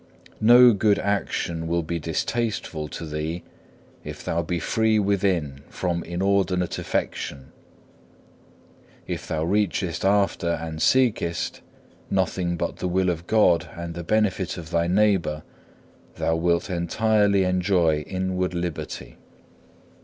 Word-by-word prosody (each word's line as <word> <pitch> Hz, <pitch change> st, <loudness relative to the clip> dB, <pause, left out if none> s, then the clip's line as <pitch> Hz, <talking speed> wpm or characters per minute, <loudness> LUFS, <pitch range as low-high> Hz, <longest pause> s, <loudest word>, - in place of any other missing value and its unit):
No 120 Hz, +2 st, +8 dB
good 105 Hz, 0 st, +3 dB
action 85 Hz, -5 st, -2 dB
will 85 Hz, 0 st, 0 dB
be 85 Hz, +2 st, -3 dB
distasteful 85 Hz, -1 st, -2 dB
to 80 Hz, -, -7 dB
thee 80 Hz, +3 st, -4 dB, 0.6 s
if -, -, -8 dB
thou 85 Hz, -, 0 dB
be 85 Hz, +1 st, -2 dB
free 110 Hz, +6 st, +1 dB
within 95 Hz, -9 st, 0 dB
from 85 Hz, -2 st, -2 dB
inordinate 90 Hz, 0 st, 0 dB
affection. 65 Hz, -2 st, -3 dB, 1.5 s
If -, -, -5 dB
thou 80 Hz, -1 st, -1 dB
reachest 95 Hz, -2 st, 0 dB
after 100 Hz, -3 st, +2 dB
and 80 Hz, -1 st, -5 dB
seekest, 115 Hz, -10 st, +1 dB, 0.5 s
nothing 90 Hz, -2 st, 0 dB
but -, -, -3 dB
the -, -, -2 dB
will 90 Hz, 0 st, +1 dB
of 85 Hz, 0 st, -6 dB
God 105 Hz, -6 st, +3 dB
and 85 Hz, -1 st, -6 dB
the 85 Hz, +1 st, -6 dB
benefit 100 Hz, -1 st, 0 dB
of 85 Hz, -1 st, -8 dB
thy 85 Hz, 0 st, +1 dB
neighbour, 90 Hz, -6 st, +2 dB, 0.7 s
thou 80 Hz, -, 0 dB
wilt 85 Hz, +1 st, +1 dB
entirely 100 Hz, +3 st, +2 dB
enjoy 90 Hz, -4 st, +2 dB
inward 90 Hz, +2 st, -2 dB
liberty. 85 Hz, -3 st, -5 dB
90 Hz, 120 wpm, -24 LUFS, 85-100 Hz, 1.5 s, No